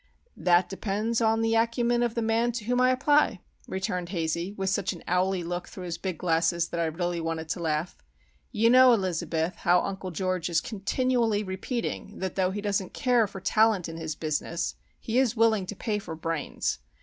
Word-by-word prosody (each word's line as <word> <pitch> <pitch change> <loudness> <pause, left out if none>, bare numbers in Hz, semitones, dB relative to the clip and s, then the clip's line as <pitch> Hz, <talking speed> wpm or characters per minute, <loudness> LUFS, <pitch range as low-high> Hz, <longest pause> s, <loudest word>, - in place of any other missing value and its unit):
"That 175 0 +3
depends 215 +4 -1
upon 225 0 +3
the 225 0 +1
acumen 235 +1 +2
of 240 -2 0
the 235 - 0
man 225 +2 +2
to 230 -2 -4
whom 250 +2 +1
I 255 - +5
apply," 275 -4 +3 0.3
returned 180 -2 -3
Hazey, 170 0 -2
with 190 -1 0
such 195 0 0
an 170 - -11
owly 180 0 +1
look 175 +1 -4
through 185 - -9
his 170 -2 -5
big 185 -4 -3
glasses 170 0 +1
that 170 - -3
I 170 - +2
really 170 +1 -2
wanted 160 -1 -3
to 180 - -2
laugh. 160 +1 -1 0.6
"You 230 0 +3
know, 255 0 +8
Elizabeth, 175 -4 -1
how 180 0 +4
Uncle 195 -1 -4
George 185 0 -2
is 165 -2 +3
continually 230 +1 0
repeating 205 +2 -4
that 190 -2 -3
though 185 -1 +1
he 205 +2 -4
doesn't 200 -2 -2
care 245 -5 +3
for 195 - -8
talent 215 -1 +3
in 165 0 -7
his 160 -2 -4
business 155 +2 -2 0.3
he 235 +3 0
is 245 -3 +1
willing 220 -4 +3
to 210 - -5
pay 210 +1 -2
for 170 -5 -7
'brains. 165 - -2
190 Hz, 195 wpm, -27 LUFS, 170-225 Hz, 0.6 s, know